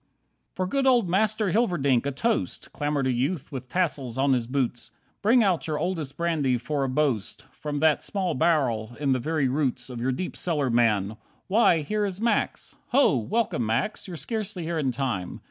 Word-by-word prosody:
4 185 - -1
"For - - -5
good 275 -1 +1
old 245 -6 +4
Master 210 +2 +1
Hilverdink, 145 - +2
a - - 0
toast!" 220 - -1
Clamoured 145 -2 -1
a 130 - +2
youth 135 +6 -2
with 130 -2 -6
tassels 140 -9 -1
on 135 0 +3
his 120 -3 0
boots. 125 -3 -2 0.3
"Bring 230 +3 +5
out 185 -6 +1
your 155 -1 -1
oldest 160 -4 -3
brandy 155 -7 +1
for 140 +4 -2
a 135 - -1
boast, 130 -6 -1
From 150 -1 -5
that 155 -2 +4
small 190 -3 -1
barrel 120 -7 +1
in 140 -2 +1
the 130 - +2
very 155 +1 0
roots 130 -1 -1
Of 120 -1 -6
your 130 +2 +1
deep 175 +8 -4
cellar, 150 -7 0
man. 110 -3 +2 0.3
Why 190 -5 +4
here 210 +8 -1
is 195 -2 -3
Max! 230 +1 0
Ho! 275 - +4
Welcome, 180 - 0
Max, 120 - -1
you're 175 -3 -6
scarcely 200 - -3
here 165 0 -2
in 135 -4 +1
time. 120 -8 -3
150 Hz, 190 wpm, -26 LUFS, 130-185 Hz, 0.3 s, Bring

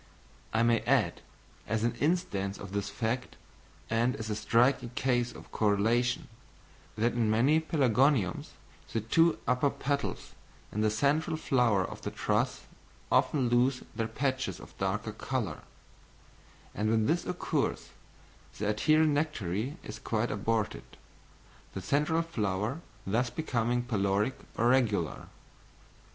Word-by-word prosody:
I 110 +1 +2
may 115 -1 +4
add, - - +1 0.5
as 110 +1 0
an 120 0 +1
instance 120 - 0
of 100 -2 -9
this 100 0 -2
fact, 115 +5 -2 0.5
and 115 +3 +1
as 110 -1 -5
a - - 0
striking 120 +3 +2
case 125 -2 +1
of - - -13
correlation, 115 +4 +1 0.7
that 115 +2 +2
in 115 -2 +1
many 130 +9 +4
pelargoniums 135 - +2 0.4
the 115 - -1
two 165 +10 +3
upper 125 +3 +3
petals 140 0 -3 0.4
in 105 - -2
the 110 - +3
central 145 +9 +1
flower 120 -10 +2
of - - -8
the - - -3
truss - - 0 0.5
often 135 -5 +3
lose 125 +2 +2
their 115 -1 -1
patches 130 -7 -2
of - - -13
darker - - -1
colour; - - -3 1.1
and 110 +1 0
when 110 -1 +2
this 165 +7 +1
occurs, 180 - -1 0.7
the 105 - -2
adherent 155 +8 +3
nectary 140 - -1
is - - -8
quite 115 +1 -1
aborted, 110 +1 -2 0.8
the 95 - -3
central 150 - +1
flower 110 - -2 0.2
thus 120 +5 +1
becoming 120 -5 -1
peloric 105 0 +1 0.2
or 120 +1 +3
regular. 110 -10 +1
120 Hz, 130 wpm, -30 LUFS, 110-135 Hz, 1.1 s, may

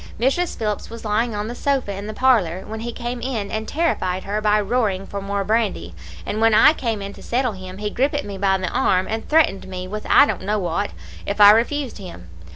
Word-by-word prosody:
Mrs. 275 +9 0
Phillips 210 -2 -3
was 230 0 -9
lying 215 +2 0
on 205 +1 -3
the 235 - -5
sofa 265 -5 -1
in 200 +2 -6
the 215 - -5
parlour, 200 -9 +2
when 220 +1 -6
he 235 +2 -4
came 240 +1 -5
in 230 -5 -3
and 220 0 -3
terrified 190 - -1
her 205 +2 -2
by 210 0 +3
roaring 205 -3 0
for 200 0 -6
more 200 0 -2
brandy; 220 0 -1 0.3
and 215 +2 -3
when 225 -1 +5
I 295 +8 +7
came 225 -8 -3
in 200 0 -6
to - - -13
settle 250 0 0
him, 185 -1 -9
he 210 0 -3
grippit 285 +5 0
me 200 -1 -7
by 195 -1 +2
the 185 -2 -3
arm 185 0 +2
and 220 +1 -4
threatened 305 -13 +2
me 185 -1 -6
with 210 +2 -6
I - - +7
don't - - -3
know 205 +3 -1
what, 195 +1 -1 0.4
if 200 +1 -3
I 205 0 +10
refused 240 +3 0
him. 90 - -10
210 Hz, 230 wpm, -21 LUFS, 195-240 Hz, 0.4 s, I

